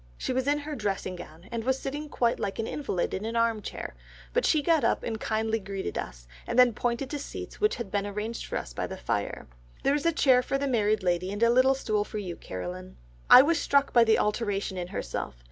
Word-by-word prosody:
She - - -2
was 260 +1 -1
in 290 +1 +3
her 295 +1 -5
dressing 195 -5 -2
gown, 175 0 -11
and 230 -1 -3
was 260 +2 +1
sitting 295 +3 -5
quite 235 -3 +1
like 195 - -3
an 225 - -1
invalid 225 -10 -2
in 190 - -3
an 225 +1 -3
arm 230 -2 +2
chair, - - -6 0.4
but - - +2
she 305 -2 +3
got 320 -2 +3
up 230 - +1
and 220 -2 -3
kindly 220 0 0
greeted 195 -1 -5
us, - - -6 0.2
and - - -2
then 250 -2 +7
pointing 245 +4 -1
to 290 - -3
seats 280 - -8
which 425 - +3
had 220 -5 -6
been 205 0 0
arranged 210 +3 -4
for - - -2
us - - -6
by - - -3
the - - -7
fire, - - -3 0.4
'There 275 - +3
is 295 +2 0
a - - +4
chair 260 -5 +4
for 275 - -1
the 280 - -2
married 215 -5 +1
lady, 180 +1 0
and 205 +3 -1
a 235 - +6
little 260 +2 +5
stool 215 -5 0
for 215 - -7
you, 185 -5 -4
Caroline.'... 90 - -7 0.3
I 255 - +11
was 320 +2 +2
struck 280 0 +2
by 235 - +7
the 220 -1 +4
alteration 205 -2 -1
in 180 -1 -4
herself. 65 - -4
225 Hz, 240 wpm, -28 LUFS, 195-265 Hz, 0.4 s, I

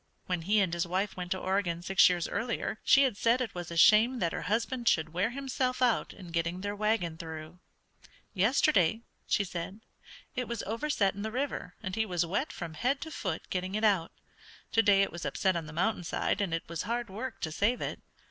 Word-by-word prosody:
When 180 -2 -1
he 205 +6 +2
and 185 -3 0
his 170 0 -1
wife 190 +3 -1
went 180 -1 -5
to 185 - 0
Oregon 185 -3 -1
six 190 +1 +6
years 175 -2 0
earlier 225 +1 -2
she 275 - +6
had 250 -7 +1
said 235 +3 +3
it 245 -5 -3
was 175 -1 -6
a 170 - -5
shame 220 +8 +6
that 170 -7 0
her - - -3
husband 235 +2 -1
should 160 -4 +2
wear 185 +6 +1
himself 255 -1 -2
out 250 -3 +2
in 180 -4 -11
getting 170 +2 -1
their 205 +1 -3
wagon 205 -6 0
through. 160 0 -8 0.7
"Yesterday," 220 - +3 0.3
she 205 - +2
said, 185 +3 -6 0.5
"it 250 -2 -2
was 235 -2 -3
overset 225 -2 0
in 200 - -7
the 220 - -2
river 255 -7 -3
and 190 0 -3
he 220 0 0
was 175 -2 0
wet 205 - -1
from 170 -2 -6
head 255 - 0
to 320 - -6
foot 185 - -4
getting 185 +1 -2
it 215 - -1
out; 195 -6 +3 0.6
to 225 - +5
day 200 -3 +5
it - - -2
was 175 - -7
upset 190 -2 +1
on 165 -2 -3
the - - -8
mountainside, 180 +2 0
and 195 -4 -1
it 165 0 -2
was 170 -1 -4
hard 235 +3 -2
work 215 +2 -6
to 160 - -2
save 210 +9 +1
it." - - -4
195 Hz, 215 wpm, -30 LUFS, 175-230 Hz, 0.7 s, six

